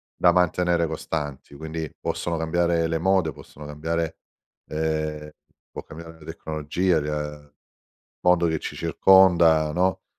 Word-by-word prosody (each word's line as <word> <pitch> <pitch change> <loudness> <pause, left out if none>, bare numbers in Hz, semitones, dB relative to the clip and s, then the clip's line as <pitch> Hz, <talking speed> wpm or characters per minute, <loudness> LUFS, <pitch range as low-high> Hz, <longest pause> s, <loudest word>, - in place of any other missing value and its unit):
da 90 - +4
mantenere 90 -1 +2
costanti. 75 -3 -5
Quindi, 80 +1 -5
possono 85 - -2
cambiare 85 0 +1
le 80 - -1
mode, 90 -2 +2
possono 75 +2 -13
cambiare 80 +2 -3 0.5
ehm, 75 -1 -2 0.4
può - - -7
cambiare 80 +1 -11
la 75 - -14
tecnologia, 80 +2 -1
ia 75 -1 -5 0.7
mondo 90 -1 +3
che 80 -1 -1
ci - - -6
circonda, 85 -5 +5
no, 95 +1 0
80 Hz, 125 wpm, -24 LUFS, 75-85 Hz, 0.7 s, circonda